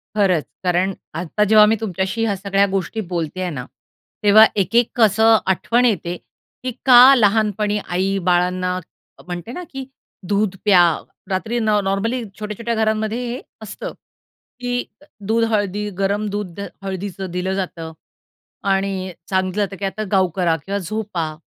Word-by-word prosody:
खरंच 185 -7 +2 0.2
कारण 180 +2 +1 0.3
आत्ता 180 +5 0
जेव्हा 210 0 +7
मी 215 +1 +3
तुमच्याशी 195 +2 -2
ह्या 205 -3 0
सगळ्या 195 +1 +1
गोष्टी 195 +3 -2
बोलते 170 +1 -3
आहे 180 - -1
ना, 125 -5 -5 0.6
तेव्हा 215 +2 +8
एक-एक 230 +4 +2
कसं 220 0 +5
आठवण 230 +6 +2
येते 180 -6 0 0.5
की 255 - -2
का 255 +1 +9
लहानपणी 210 -2 +2
आई 190 +2 0
बाळांना 180 +1 +1 0.4
अ - - -15
म्हणते 175 +5 -6
ना 360 +8 -6
की 270 -1 -6 0.4
दूध 200 -1 0
प्या. 190 -4 +6 0.5
रात्री 220 +5 -1
न 220 -2 0
नॉर्मली 225 +6 -1 0.2
छोट्या-छोट्या 215 +2 -3
घरांमध्ये 220 0 0
हे 245 +3 -4 0.2
असतं 215 - -7 0.7
की 245 0 -2 0.4
दूध 230 +1 +2
हळदी 205 0 -1
गरम 200 +2 0
दूध 200 -3 -5 0.2
हळदीचं 190 -1 -5
दिलं 180 +2 -2
जातं 170 -4 -4 0.8
आणि 195 -1 -1 0.2
सांगितल 190 +1 0
जातं 200 -1 -1
की 200 - -2
आता 205 +3 -3
गाउ 190 -2 +4
करा 175 -4 +2
किंवा 200 +1 -2
झोपा. 185 -5 -4
200 Hz, 145 wpm, -20 LUFS, 185-220 Hz, 0.8 s, का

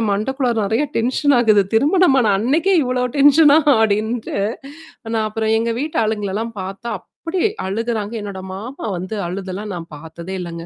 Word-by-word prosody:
என் 225 - 0
மண்டக்குள்ளார 245 +3 -1
நெறைய 225 +9 0
டென்ஷன் 260 +4 +2
ஆகுது. 215 -4 +4
திருமணமான 270 - +4
அன்னைக்கே 320 - +2
இவ்வளோ 250 0 0
டென்ஷனா 290 +1 +6 0.2
அப்படின்ட்டு, 220 +2 -1 0.8
நான் 220 -1 +1
அப்புறம் 220 +1 -1
எங்க 230 0 -1
வீட்டு 300 -4 -2
ஆளுங்களல்லாம் 215 +1 -2
பார்த்தா 195 +5 -7
அப்படி 340 +2 -5 0.3
அழுகுறாங்க. 225 +1 -2
என்னோட 195 -2 -6
மாமா 235 +8 -7
வந்து 185 +5 -5
அழுதெல்லாம் 195 +2 -5
நான் 170 -1 -8
பார்த்ததே 170 +4 -8
இல்லங்க. 170 -1 -7
220 Hz, 140 wpm, -19 LUFS, 200-260 Hz, 0.8 s, டென்ஷனா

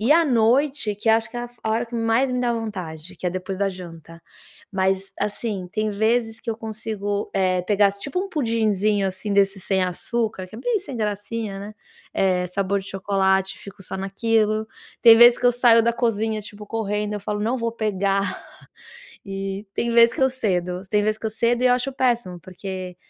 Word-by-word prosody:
e 230 +6 +1
à 335 +1 +5
noite 245 -2 +2
que 210 - -3
acho 225 +1 +3
que - - -8
a 240 0 -3
fo 240 - -26
é - - -1
a - - +1
hora 230 +2 0
que 235 - -10
mais 230 +3 +2
me 250 0 -1
dá 240 -1 +1
vontade 185 -8 -5
que - - -5
é - - +1
depois 185 +1 -5
da 200 0 +1
janta, 165 -3 -10 0.5
mas, 190 0 0
assim, 205 -2 -3
tem 215 0 0
vezes 225 +2 0
que - - -4
eu 220 - -3
consigo, 215 -2 -4
eh, 185 -1 +2
pegar 200 +1 +3
tipo, 230 - -5
um 390 - -4
pudizinho, 215 - +1
assim, 190 +2 -4
desse 195 0 +2
sem 190 +1 0
açúcar, 210 +2 -3
que 215 - -11
é - - -8
bem 440 - 0
sem 320 -10 -8
gracinha 210 -1 -3
né, 205 +2 -8 0.4
eh, 185 -2 +1
sabor 195 +2 -1
de 195 - -11
chocolate 190 0 +1
e - - -16
fico 200 0 -11
só 190 - -6
naquilo, 215 +2 0 0.4
tem 230 -1 +9
vez 240 0 +8
que 245 - +1
eu 245 - +5
saio 235 -1 +5
da 235 - +3
cozinha, 220 -2 0
tipo, 210 0 -11
correndo 210 -1 -2
eu 205 - -4
falo: 205 +1 -3
"Não 230 +5 0
vou 230 -1 -1
pegar", 200 -3 -1 0.8
e 195 +1 -4
tem 235 - -1
vez 235 0 +6
que - - -1
eu 265 - +4
cedo, 180 -7 -1
tem 210 0 +3
vez 215 0 +1
que 220 - -4
eu - - -2
cedo 235 +3 +1
e - - +5
eu 250 - +5
acho 255 +2 -2
péssimo, 240 -9 0
porque 185 +1 -7
210 Hz, 210 wpm, -23 LUFS, 195-230 Hz, 0.8 s, tem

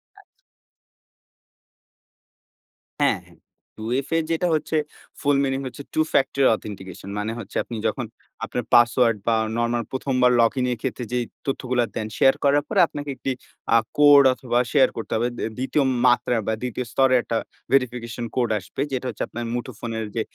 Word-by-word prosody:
আচ্ছা। - - -17 2.8
হ্যাঁ, - - +3 0.6
2FA 130 +8 -1
যেটা 170 +2 +1
হচ্ছে 155 - -2 0.5
ফুল 145 -1 +3
মিনিং 135 0 0
হচ্ছে 140 - -8
Two-factor 140 -3 +1
authentication 95 -3 -9
মানে 110 +2 -2
হচ্ছে 110 - -10
আপনি 120 - -7
যখন 125 -4 -2 0.4
আপনার 125 +1 -3
পাসওয়ার্ড, 120 -1 +5
বা 115 - +4 0.2
নরমাল 120 0 0
১ম 130 0 -2
বার 125 0 +6
লগইন 125 +2 +2
এর 120 - -2
ক্ষেত্রে, 125 -1 -3
যেই 125 -1 0 0.2
তথ্যগুলা 125 -2 0
দেন 110 -1 -2
শেয়ার 135 - +5
করার 145 +1 +3
পরে 205 -3 +1
আপনাকে 145 -1 -7
একটি 135 - -3 0.4
আ - - +8 0.2
কোড 145 -1 +8
অথবা 125 -1 -1
শেয়ার 140 - +5
করতে 115 - -6
হবে। 120 +2 +1
দি - - -4
২য় 135 +3 +1 0.2
মাত্রার 120 -1 +3
বা 110 - +1
২য় 125 0 -3
স্তরের 130 -1 +4
একটা 115 - -1 0.3
ভেরিফিকেশন 120 -3 0
কোড 120 -3 +1
আসবে, 130 - -7
যেটা 130 0 -2
হচ্ছে 110 - -4
আপনার 120 +1 -6
মুঠোফোনের 115 -2 -4
যে 115 - +1
125 Hz, 155 wpm, -23 LUFS, 115-135 Hz, 2.8 s, আ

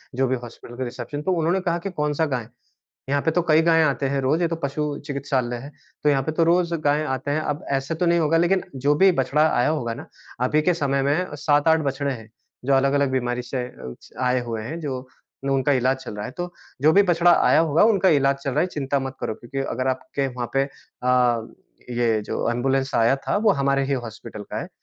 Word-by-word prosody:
जो 135 0 +1
भी 130 - +1
हॉस्पिटल 120 0 -11
का 130 - -2
रिसेप्शन 145 +4 -5
तो 190 - -1
उन्होंने 170 +3 +1
कहा 170 -1 0
कि - - -1
कौन-सा 150 0 0
गाय 130 -5 -2
है? 110 - -17 0.6
यहाँ 140 0 +1
पे 160 - +1
तो 175 - +2
कई 155 +1 +6
गायें 165 -1 +4
आती 140 -1 0
हैं 140 0 0
रोज़, 150 +6 +1
ये 170 - +3
तो 165 - -2
पशु 145 -1 -3
चिकित्सालय 135 -4 -2
है 140 +5 -9 0.3
तो 150 - +4
यहाँ 135 -2 +2
पे 155 - -2
तो 165 +1 +2
रोज़ 170 0 +2
गायें 150 +1 +1
आते 130 +1 -2
हैं। 155 - +1
अब 150 -1 -3
ऐसा 135 +4 -3
तो 175 - 0
नहीं 170 0 +3
होगा, 165 +1 +2
लेकिन 180 +3 +2
जो 140 +3 +2
भी 190 +4 +5
बछड़ा 150 +4 +2
आया 125 0 +2
होगा 120 -7 -1
ना - - -9 0.4
अभी 150 +4 +2
के 180 +3 +2
समय 140 -4 0
में 150 +3 0
7-8 150 +2 +3
बछड़े 140 0 -1
हैं 110 -2 -10 0.4
जो 140 - +2
अलग-अलग 140 0 +2
बीमारी 125 -1 -1
से 125 +1 -4
अ, - - -15
उसे 65 -1 -11
आए 125 0 +2
हुए 115 -2 -4
हैं, 160 +8 -5
जो 130 -4 -5 0.4
उनका 135 +1 +2
इलाज 130 +1 +2
चल 120 - -8
रहा 105 - -5
है, - - -6
तो 175 +3 -6 0.3
जो 155 +2 +6
भी 200 - +6
बछड़ा 175 -1 +4 0.2
आया - - +5
होगा, 160 +2 +3
उनका 200 -4 +4
इलाज 140 -2 +3
चल 140 - -1
रहा 145 - 0
है, 180 - +1
चिंता 140 -4 -2
मत 135 0 -5
करो 120 -2 -2
क्योंकि 135 +3 -7
अगर 130 +2 -2
आपके 135 +1 -2
वहाँ 125 -2 -5
पे 135 0 +3
अ, 125 -4 -1 0.4
ये 115 -3 +2
जो 115 - -2
एंबुलेंस 135 +3 0
आया 115 +4 +4
था, 140 - -2
वो 210 -1 +4
हमारे 140 0 +2
ही 140 - -1
हॉस्पिटल 110 -1 -8
का - - -3
है। - - -7
140 Hz, 235 wpm, -23 LUFS, 130-160 Hz, 0.6 s, कई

